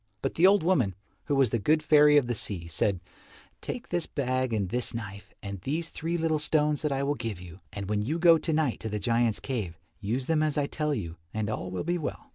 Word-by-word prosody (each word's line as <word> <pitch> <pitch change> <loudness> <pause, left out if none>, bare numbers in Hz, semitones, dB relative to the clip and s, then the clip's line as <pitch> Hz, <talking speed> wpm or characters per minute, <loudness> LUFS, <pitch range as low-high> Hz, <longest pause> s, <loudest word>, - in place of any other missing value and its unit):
But 135 - -1
the 175 +3 +5
old 200 -2 +4
woman, 135 - +2 0.3
who 145 - 0
was 135 -5 +3
the 115 - +1
good 155 +8 +2
fairy 150 -1 +6
of 140 - +4
the 120 - -1
sea, 95 -6 -3
said, 90 +4 +1 0.6
"Take 250 +1 -5
this 175 -1 -1
bag 130 -2 -1
and 100 -4 -1
this 120 +2 -2
knife 100 -3 -7
and 100 -2 -6
these 160 - -2
three 165 +2 -3
little 160 -2 +1
stones 150 -1 +1
that 150 -2 -1
I 135 0 0
will 140 +1 +1
give 115 -9 -5
you, 90 0 -11
and 100 -2 -5
when 105 0 0
you 145 +10 -1
go 170 -1 +6
to 165 - -2
night 155 -5 +1
to 110 - -5
the 105 - -2
giants' 115 +1 +1
cave, 105 -11 -4 0.2
use 120 +6 -2
them 160 +1 +1
as 155 -1 0
I 145 - +2
tell 150 0 -1
you 85 -8 -5 0.2
and 110 0 -1
all 95 -3 -4
will 90 0 -3
be 175 +2 -1
well." 155 - -5
130 Hz, 245 wpm, -28 LUFS, 105-155 Hz, 0.6 s, fairy